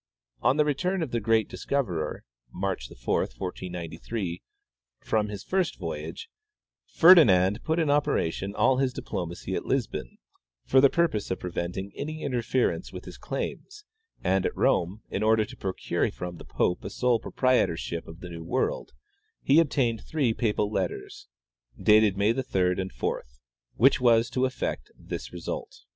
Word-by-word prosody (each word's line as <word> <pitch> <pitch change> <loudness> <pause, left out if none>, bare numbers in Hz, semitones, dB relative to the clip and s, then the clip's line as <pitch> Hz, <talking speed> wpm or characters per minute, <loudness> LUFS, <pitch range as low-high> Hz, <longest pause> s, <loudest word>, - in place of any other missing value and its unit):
On 135 - +3
the 150 - +4
return 180 +5 0
of 145 - -5
the 120 - 0
great 110 0 +2
discoverer 100 - -2 0.3
(March 95 -9 -3
4, - - -1
1493) 90 - -5 0.6
from 105 -1 0
his 100 -1 -6
first 185 -2 0
voyage, 80 0 -5 0.6
Ferdinand 105 - +6
put 160 +1 0
in 160 -4 +2
operation 100 - 0
all 130 - +3
his 130 -1 +1
diplomacy 85 -8 -5
at - - -2
Lisbon - - -2 0.5
for 130 - +5
the 140 - +7
purpose 165 - 0
of 95 - -2
preventing 90 +2 -4
any 155 +2 -5
interference 125 -1 0
with - - -8
his - - -10
claims, 420 +1 -5 0.4
and 95 0 +2
at - - -2
Rome, 95 +5 +1
in - - -2
order 110 0 +3
to 125 +4 -11
procure 95 -5 -1
from 85 +8 -6
the - - -11
pope 90 - 0
a - - -4
sole 125 -2 +1
proprietorship 90 -10 0
of 80 +1 -11
the 90 - -7
new 85 -1 -7
world, 85 - -1 0.5
he 140 +4 +5
obtained 130 -8 +1
three 140 -8 0
papal 105 -2 0
letters, 410 - -4 0.5
dated 105 -2 +5
May 105 +3 +3
3d 95 -8 0
and 95 - -5
4th, 60 +1 -4 0.4
which 135 +2 +4
was 120 -1 +4
to 130 +1 +1
effect 130 - -3
this - - -7
result. - - -6
110 Hz, 155 wpm, -27 LUFS, 90-135 Hz, 0.6 s, the